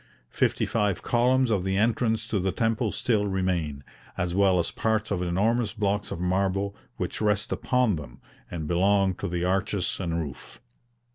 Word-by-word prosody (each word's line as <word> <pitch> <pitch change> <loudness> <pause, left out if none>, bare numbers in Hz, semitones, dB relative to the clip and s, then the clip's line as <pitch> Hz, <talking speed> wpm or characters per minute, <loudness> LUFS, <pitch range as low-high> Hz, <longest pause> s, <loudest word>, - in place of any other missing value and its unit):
Fifty - - +1
five 105 -4 0
columns 125 +1 +3
of 100 -4 +1
the 95 0 0
entrance 115 +1 +1
to 105 -3 0
the 95 +1 0
temple 115 0 0
still 105 -4 +1
remain, 90 -7 -1 0.3
as 90 -1 -1
well 95 -1 +4
as 85 - 0
parts 110 -1 -1
of 95 -3 0
enormous 105 +5 +1
blocks 105 -1 -1
of - - -5
marble 95 +2 0 0.2
which - - -3
rest 105 0 +1
upon 125 -8 +1
them, 65 -4 -10 0.3
and 80 -3 -5
belonged 95 +2 +2
to 100 - -2
the 90 -1 -2
arches 95 +1 0
and 85 -3 -1
roof. 75 -6 -7
100 Hz, 165 wpm, -26 LUFS, 90-110 Hz, 0.3 s, well